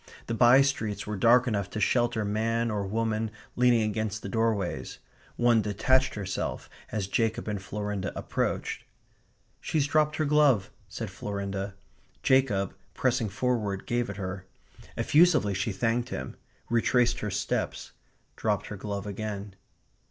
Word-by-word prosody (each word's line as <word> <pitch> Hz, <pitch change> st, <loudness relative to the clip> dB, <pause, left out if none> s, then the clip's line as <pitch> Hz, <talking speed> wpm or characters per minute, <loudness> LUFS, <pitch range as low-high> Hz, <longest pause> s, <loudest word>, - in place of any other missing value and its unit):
The 115 Hz, -, -3 dB
by 120 Hz, +4 st, +6 dB
streets 110 Hz, -7 st, -2 dB
were 105 Hz, -, -3 dB
dark 120 Hz, +5 st, +5 dB
enough 100 Hz, -5 st, -1 dB
to 110 Hz, -, -4 dB
shelter 120 Hz, 0 st, +2 dB
man 115 Hz, +3 st, 0 dB
or 100 Hz, -2 st, -2 dB
woman 110 Hz, +1 st, -1 dB, 0.3 s
leaning 120 Hz, -2 st, +4 dB
against 110 Hz, 0 st, -2 dB
the 100 Hz, -, -4 dB
doorways. 110 Hz, -4 st, -1 dB, 0.4 s
One 120 Hz, -2 st, +4 dB
detached 130 Hz, +6 st, +2 dB
herself 100 Hz, -3 st, -3 dB, 0.2 s
as 105 Hz, -3 st, -1 dB
Jacob 110 Hz, +3 st, 0 dB
and 105 Hz, -2 st, -2 dB
Florinda 105 Hz, -1 st, -3 dB
approached. -, -, -2 dB, 0.8 s
"She's 150 Hz, -3 st, 0 dB
dropped 150 Hz, +1 st, +2 dB
her 155 Hz, -, 0 dB
glove," 145 Hz, -9 st, +3 dB, 0.2 s
said -, -, -6 dB
Florinda. 100 Hz, -1 st, -4 dB, 0.5 s
Jacob, 125 Hz, -8 st, +3 dB, 0.2 s
pressing 120 Hz, -4 st, +1 dB
forward, 105 Hz, -2 st, -1 dB
gave 120 Hz, -1 st, -1 dB
it 100 Hz, -, -6 dB
her. 95 Hz, -1 st, -5 dB, 0.5 s
Effusively 155 Hz, -, +4 dB
she 105 Hz, +4 st, -1 dB
thanked 115 Hz, +4 st, 0 dB
him; 65 Hz, -9 st, -5 dB, 0.3 s
retraced 120 Hz, +1 st, +2 dB
her 105 Hz, -, -3 dB
steps; 100 Hz, +1 st, -2 dB, 0.4 s
dropped -, -, 0 dB
her 105 Hz, -, -6 dB
glove 100 Hz, 0 st, -4 dB
again. 105 Hz, -1 st, -5 dB
110 Hz, 135 wpm, -28 LUFS, 100-120 Hz, 0.8 s, by